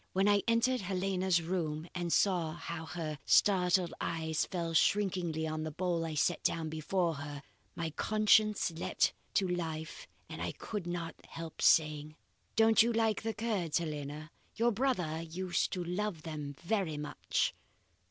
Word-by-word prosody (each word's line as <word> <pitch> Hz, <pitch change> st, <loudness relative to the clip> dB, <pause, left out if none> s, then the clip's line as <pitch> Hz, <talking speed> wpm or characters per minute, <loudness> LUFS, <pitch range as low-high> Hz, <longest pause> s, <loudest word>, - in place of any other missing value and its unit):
When 195 Hz, +2 st, +3 dB
I 205 Hz, -1 st, +5 dB
entered 230 Hz, +2 st, +2 dB
Helena's 185 Hz, -2 st, 0 dB
room 160 Hz, -2 st, -2 dB
and 175 Hz, -2 st, -2 dB
saw 175 Hz, -5 st, +2 dB
how 165 Hz, -1 st, -6 dB
her 155 Hz, -4 st, -4 dB
startled 180 Hz, -2 st, +4 dB
eyes 160 Hz, -1 st, -1 dB
fell 170 Hz, -2 st, -3 dB
shrinkingly 175 Hz, -3 st, +2 dB
on 155 Hz, 0 st, -3 dB
the 155 Hz, -, -3 dB
bowl 170 Hz, +1 st, -1 dB
I 155 Hz, -, -4 dB
set 160 Hz, +3 st, +1 dB
down 160 Hz, -1 st, 0 dB
before 165 Hz, +2 st, 0 dB
her, 145 Hz, 0 st, -7 dB, 0.3 s
my 165 Hz, -2 st, -3 dB
conscience 215 Hz, +2 st, +3 dB
leaped 165 Hz, +1 st, 0 dB, 0.2 s
to 195 Hz, -, +3 dB
life 160 Hz, -3 st, -4 dB, 0.2 s
and -, -, -7 dB
I -, -, -2 dB
could 205 Hz, -5 st, -5 dB
not 175 Hz, -1 st, -3 dB
help 165 Hz, -1 st, -8 dB
saying: 155 Hz, -1 st, +3 dB, 0.4 s
"'Don't 225 Hz, 0 st, +6 dB
you 235 Hz, +2 st, +3 dB
like 225 Hz, -2 st, +1 dB
the 225 Hz, 0 st, -3 dB
curds, 210 Hz, -8 st, 0 dB
Helena? 150 Hz, -1 st, -4 dB, 0.2 s
Your 235 Hz, +1 st, +3 dB
brother 190 Hz, -, 0 dB
used 175 Hz, +2 st, -1 dB
to 180 Hz, -, -2 dB
love 180 Hz, -1 st, -3 dB
them 150 Hz, -3 st, -5 dB
very 175 Hz, -5 st, 0 dB
much. 150 Hz, 0 st, -1 dB
175 Hz, 150 wpm, -33 LUFS, 160-195 Hz, 0.4 s, Don't